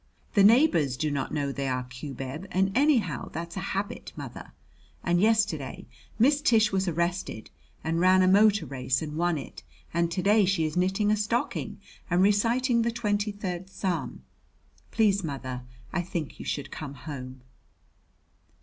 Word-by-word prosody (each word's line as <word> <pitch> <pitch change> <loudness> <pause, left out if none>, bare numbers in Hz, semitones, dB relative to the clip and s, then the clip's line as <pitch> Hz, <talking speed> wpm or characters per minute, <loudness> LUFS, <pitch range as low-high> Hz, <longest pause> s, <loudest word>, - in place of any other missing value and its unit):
The 200 - +5
neighbors 200 - +5
do 155 +1 -1
not 140 -2 -2
know 145 -2 -1
they 140 0 -3
are 130 -1 -1
cubeb, 135 +5 -7
and, 190 +1 +1
anyhow, 245 - +2
that's 170 +2 -6
a - - -3 0.2
habit, 205 +4 -4
mother. - - -8 0.5
And 175 0 +2
yesterday 215 0 +1 0.3
Miss 280 +5 +4
Tish 220 -6 +4
was 190 0 0
arrested, 170 - -2 0.3
and 165 +1 0
ran 185 +1 +5
a - - +4
motor 200 -1 +5
race 130 +1 -1
and 150 -1 -5
won 170 0 +1
it, 135 - -8 0.3
and 170 0 +1
to 180 +2 -2
day 210 +1 +5
she 185 -4 +1
is 155 - -3
knitting 190 +4 +2
a - - +4
stocking 215 +3 -2 0.3
and 175 +1 +3
reciting 235 +4 +3
the 230 - +1
Twenty 210 -2 -1
third 190 -2 -5
Psalm. 185 -3 -3 0.7
Please, 200 -3 +2
mother, 130 -4 -4 0.3
I 180 - +1
think 170 -4 -5
you - - -7
should 145 - -3
come 140 -3 -7
home. 130 -3 -8
185 Hz, 160 wpm, -27 LUFS, 150-210 Hz, 0.7 s, The